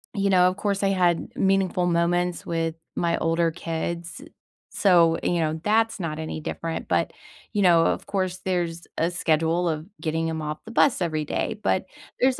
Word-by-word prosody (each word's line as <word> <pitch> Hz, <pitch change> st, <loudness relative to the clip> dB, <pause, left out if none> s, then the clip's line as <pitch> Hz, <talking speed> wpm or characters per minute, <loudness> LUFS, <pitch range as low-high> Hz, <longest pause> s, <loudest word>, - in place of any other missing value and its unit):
You 200 Hz, 0 st, +1 dB
know, 180 Hz, -2 st, +5 dB
of 185 Hz, -, -6 dB
course, 200 Hz, -1 st, -1 dB
I 195 Hz, -, +3 dB
had 180 Hz, -3 st, +1 dB
meaningful 190 Hz, -2 st, +2 dB
moments 175 Hz, +1 st, +1 dB
with 165 Hz, -1 st, -1 dB, 0.2 s
my 170 Hz, -1 st, +1 dB
older 165 Hz, 0 st, +1 dB
kids, 170 Hz, -, -4 dB, 0.5 s
so, 170 Hz, -4 st, +5 dB
you 175 Hz, -1 st, +1 dB
know, 160 Hz, 0 st, -1 dB
that's 225 Hz, 0 st, +2 dB
not 155 Hz, -3 st, -3 dB
any 160 Hz, 0 st, -4 dB
different. 165 Hz, +1 st, -4 dB
But, -, -, 0 dB, 0.4 s
you 205 Hz, -, +1 dB
know, 170 Hz, -3 st, +5 dB
of -, -, -1 dB
course, 185 Hz, -2 st, -2 dB
there's 170 Hz, -2 st, -2 dB
a 165 Hz, +2 st, +1 dB
schedule 165 Hz, 0 st, +1 dB
of 155 Hz, 0 st, -3 dB, 0.2 s
getting 160 Hz, 0 st, -1 dB
him 160 Hz, -1 st, -3 dB
off 150 Hz, 0 st, -4 dB
the 225 Hz, -, -9 dB
bus 255 Hz, 0 st, +3 dB
every 155 Hz, -3 st, -1 dB
day. 205 Hz, -, -2 dB
But 190 Hz, -, +1 dB, 0.4 s
there's 260 Hz, 0 st, +3 dB
170 Hz, 180 wpm, -25 LUFS, 165-190 Hz, 0.5 s, know